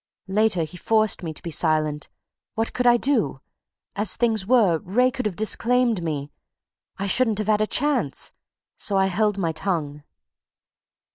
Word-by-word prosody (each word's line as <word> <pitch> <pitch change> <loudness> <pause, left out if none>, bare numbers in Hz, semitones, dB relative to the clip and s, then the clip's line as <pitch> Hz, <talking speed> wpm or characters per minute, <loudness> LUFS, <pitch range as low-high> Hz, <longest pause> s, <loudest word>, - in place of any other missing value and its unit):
Later 200 -3 +2
he 160 +3 -8
forced 215 +3 +1
me 165 -3 -4
to 155 - -9
be 170 - -5
silent. 155 -2 0 0.5
What 225 +1 -1
could 250 -1 0
I 240 0 +6
do? 235 - 0 0.6
As 205 -1 +1
things 220 -4 0
were, 210 -10 +4
Wraye 250 +10 +1
could 255 -4 -2
have 195 - -5
disclaimed 230 +1 +1
me 150 -3 -4 0.7
I 195 - -3
shouldn't 225 +1 +1
have 215 - -1
had 215 0 +3
a 215 - +1
chance. 260 - 0 0.4
So 200 - -1
I 190 - +3
held 210 +2 0
my 170 -4 0
tongue." 155 -4 -3
205 Hz, 160 wpm, -23 LUFS, 165-225 Hz, 0.7 s, I